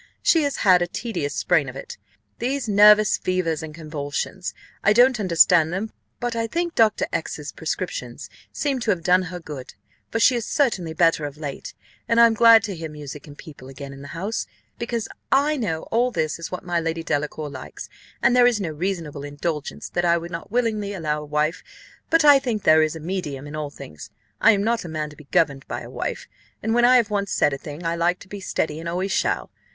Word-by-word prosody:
She 330 - +4
has 285 -2 -1
had 180 -2 +6
a 175 - +1
tedious 175 -8 -4
sprain 160 -6 +2
of 130 - -10
it; 135 - -8 0.4
these 260 +2 -2
nervous 210 0 +6
fevers 180 -4 -1
and 160 -1 -7
convulsions 155 +3 -5 0.3
I 210 - +5
don't 245 +1 +5
understand 170 -3 +4
them, 200 +5 -3 0.3
but 240 -1 -2
I 230 0 -1
think 340 +7 -2
Dr. 220 -2 +3
X - - -2
's - - -7
prescriptions - - -5 0.2
seem 280 -3 -1
to 230 - -3
have 180 -5 +1
done 180 +2 +4
her 180 0 -6
good, 145 -6 -9 0.3
for 225 - -1
she 245 +3 +5
is 235 - -1
certainly 195 - 0
better 165 -2 +3
of 145 0 -7
late, 145 -3 -7 0.3
and 230 - +3
I 235 - +9
am 230 - +4
glad 230 0 +7
to 200 - -4
hear 160 -1 -6
music 150 -1 -9
and 145 -1 -12
people 145 -5 -12
again 140 +1 -9
in 135 - -11
the 140 - -9
house, 205 +6 -3 0.3
because 235 -1 -3 0.2
I 290 +3 +3
know 175 - -2
all 240 +2 +2
this 160 -9 -2
is 165 - -5
what 180 - -6
my 175 -1 0
Lady 165 0 -3
Delacour 150 -1 -2
likes, 130 - -8 0.4
and 250 - +4
there 245 -1 +6
is 240 -3 +2
no 185 -5 -2
reasonable 160 -3 -4
indulgence 145 +1 -4
that 175 - -1
I 170 -1 +3
would 170 +1 -7
not 165 -1 -6
willingly 215 -3 -1
allow 150 -5 -2
a - - -8
wife; 150 +3 -1 0.5
but 325 -1 +4
I 290 -2 +8
think 240 -6 -3
there 155 0 +6
is 155 +1 0
a - - -6
medium 155 -5 -4
in 145 +1 -8
all 150 -1 -3
things. 75 - -11 0.3
I 230 - +7
am 200 -1 0
not 230 +1 0
a 170 - -7
man 155 -1 -4
to - - -14
be 150 - -15
governed 140 -2 +1
by - - -4
a - - -10
wife, - - -4 0.4
and 225 +1 0
when 240 0 +4
I 250 +1 +7
have 225 -4 +1
once 200 -1 -1
said 145 - +2
a - - -2
thing, 150 +4 -8
I 165 0 0
like 175 +1 +1
to - - -12
be 200 +1 -7
steady 160 -4 -2
and 165 +1 -5
always 185 +3 -2
shall. - - 0
175 Hz, 225 wpm, -23 LUFS, 155-225 Hz, 0.5 s, I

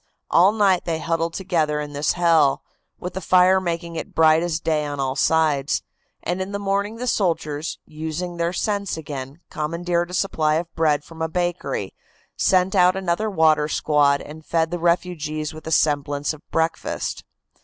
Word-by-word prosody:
All 185 +4 +6
night 200 -4 +2
they 165 -2 -1
huddled 165 +1 -1
together 160 -6 0
in 150 -1 -5
this 145 +1 +1
hell, 165 -5 +3 0.4
with 180 0 -5
the 190 - -4
fire 185 +2 +4
making 170 -1 -3
it - - -6
bright 160 0 +5
as 170 -2 -1
day 155 -2 0
on 145 -1 -4
all 135 -1 -1
sides; 150 -2 +2 0.4
and 180 +2 -2
in 190 +2 -5
the - - -1
morning 200 +2 -1
the 245 +2 -5
soldiers, 165 -8 -1
using 160 +3 -5
their 170 0 0
sense 200 -1 -2
again, 140 0 -7
commandeered 170 +2 -1
a 180 - -4
supply 155 -6 +1
of 170 +1 -3
bread 150 -3 +1
from 165 +1 -12
a 160 - 0
bakery, 175 +1 -2 0.4
sent 185 0 +2
out 180 -1 +5
another 190 +3 -1
water 155 -5 +3
squad, 145 -2 +2
and 155 +1 -10
fed 160 +1 0
the 175 - -2
refugees 160 -3 -1
with 155 0 -11
a - - -3
semblance 145 -1 +1
of 155 - -12
breakfast. 165 0 -2
165 Hz, 175 wpm, -22 LUFS, 155-180 Hz, 0.4 s, All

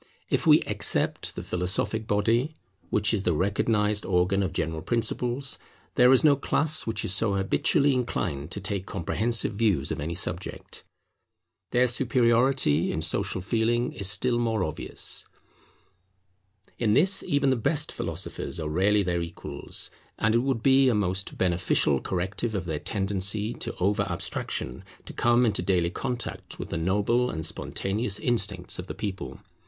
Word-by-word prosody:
If - - +1
we - - +7
except - - 0
the - - -5
philosophic 95 +5 -1
body, 115 +9 +1 0.3
which 105 0 +2
is 105 - +1
the 90 - +1
recognized 105 +4 +1
organ 95 +2 +2
of 95 -1 -1
general 80 -2 -2
principles, 120 - -1 0.3
there 125 +1 +6
is 130 - +5
no 150 -2 +6
class 150 +2 0
which 110 -2 -2
is 95 - +1
so 100 0 +2
habitually 140 - +2
inclined 90 - -2
to - - -5
take 100 0 -3
comprehensive 110 +4 0
views 100 -10 +1
of - - -3
any 80 +4 -3
subject. 90 0 -4 0.9
Their 125 +1 +3
superiority 120 - +2
in 80 - -2
Social 95 +4 -1
Feeling 115 +5 0
is 100 -4 +2
still 120 +4 +2
more 115 -4 0
obvious. 75 - -4 1.5
In 110 -3 +2
this 190 +5 +5
even 140 -2 +1
the - - +3
best 150 +6 0
philosophers 85 0 -4
are 80 - -3
rarely 100 +6 +3
their 90 -2 -1
equals; 85 0 -3 0.3
and 105 +1 +2
it 115 - +4
would 125 -2 -1
be 135 -1 +5
a 120 - +2
most 100 -1 -1
beneficial 90 0 +1
corrective 95 +5 -2
of 95 -2 -2
their 80 -3 -3
tendency 100 +3 -1
to - - -5
over 100 +3 +1
abstraction 65 -6 -3 0.2
to - - -8
come 120 +1 +3
into 105 -3 0
daily 90 -3 +1
contact 125 +3 -4
with - - -6
the 85 - -2
noble 105 +8 +1
and 80 -1 -3
spontaneous 100 +6 -2
instincts 105 -6 -1
of 90 - -6
the - - -6
people. 100 -3 -5
105 Hz, 155 wpm, -26 LUFS, 90-120 Hz, 1.5 s, we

